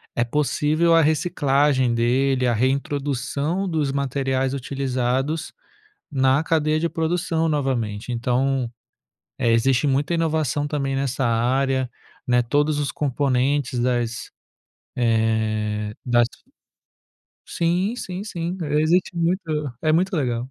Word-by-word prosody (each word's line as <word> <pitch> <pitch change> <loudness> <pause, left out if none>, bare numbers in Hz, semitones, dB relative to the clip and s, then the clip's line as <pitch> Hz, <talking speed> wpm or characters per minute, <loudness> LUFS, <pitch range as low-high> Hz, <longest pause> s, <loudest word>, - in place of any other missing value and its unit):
é 120 - +2
possível 150 +5 +2
a 165 - +6
reciclagem 145 -5 +2
dele, 130 +2 +2
a 120 - +2
reintrodução 140 - -1
dos 155 -5 0
materiais 135 -1 -1
utilizados 135 +2 -2 0.6
na 135 +1 +2
cadeia 155 -1 +1
de 170 - +1
produção 165 0 0
novamente, 125 -7 -2
então, 125 +1 0 0.7
eh, 115 - +2
existe 125 +4 +2
muita 145 +4 +1
inovação 155 -3 0
também 140 -2 -2
nessa 135 -1 -1
área, 130 +3 +1 0.4
né, 125 -1 +3
todos 145 +4 +1
os 145 - -1
componentes 135 -1 0
das 120 -1 -1 0.6
eh, 110 -2 0
das 120 -1 +3 1.2
Sim, 175 +6 0
sim, 185 -4 -5
sim, 175 -3 -4
existe 160 +4 +1
muito 165 -5 -1
é 155 -1 +2
muito 185 +4 +2
legal. 125 -2 -2
135 Hz, 110 wpm, -22 LUFS, 125-155 Hz, 1.2 s, a